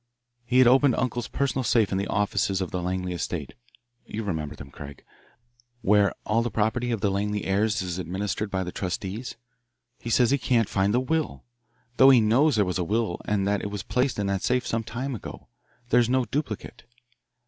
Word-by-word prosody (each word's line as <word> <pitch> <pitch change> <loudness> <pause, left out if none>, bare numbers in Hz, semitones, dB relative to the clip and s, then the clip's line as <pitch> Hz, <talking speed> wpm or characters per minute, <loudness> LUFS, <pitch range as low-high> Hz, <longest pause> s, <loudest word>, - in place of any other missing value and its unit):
"He 125 +1 +1
has 130 - +7
opened 130 +1 +5
uncle's 120 -2 -2
personal 135 -1 -1
safe 110 -2 +2
in 95 - 0
the 100 - -2
offices 100 -2 0
of 95 - -3
the 90 - -2
Langley 90 0 -2
estate 85 - -4 0.5
you 110 - -5
remember 80 -7 -3
them, 70 - -11
Craig 70 0 -11 0.8
where 100 0 +4
all 110 +2 +2
the 120 - -1
property 110 +3 0
of 115 -4 -1
the 100 - +1
Langley 105 +1 -1
heirs 105 +1 +1
is 90 0 -4
administered 100 +4 -3
by 95 -1 -1
the 90 - -5
trustees. 95 +6 -4 0.6
He 120 - -6
says 120 +1 +3
he 140 - +2
can't 120 -4 +2
find 100 0 +1
the 120 - +3
will, 160 +4 -2 0.5
though 135 - +8
he 130 -3 +7
knows 120 +7 +3
there 105 -2 +3
was 90 0 -2
a - - +1
will 105 0 -1
and 100 -2 0
that 100 0 +1
it 105 - -4
was 100 -1 -5
placed 125 0 0
in 100 - -1
that 100 -1 -1
safe 125 0 +1
some 115 0 -1
time 125 +5 -4
ago. 115 - -9 0.4
There 125 - +5
is 120 -1 +2
no 130 0 +2
duplicate." 115 -3 -4
105 Hz, 205 wpm, -26 LUFS, 95-125 Hz, 0.8 s, though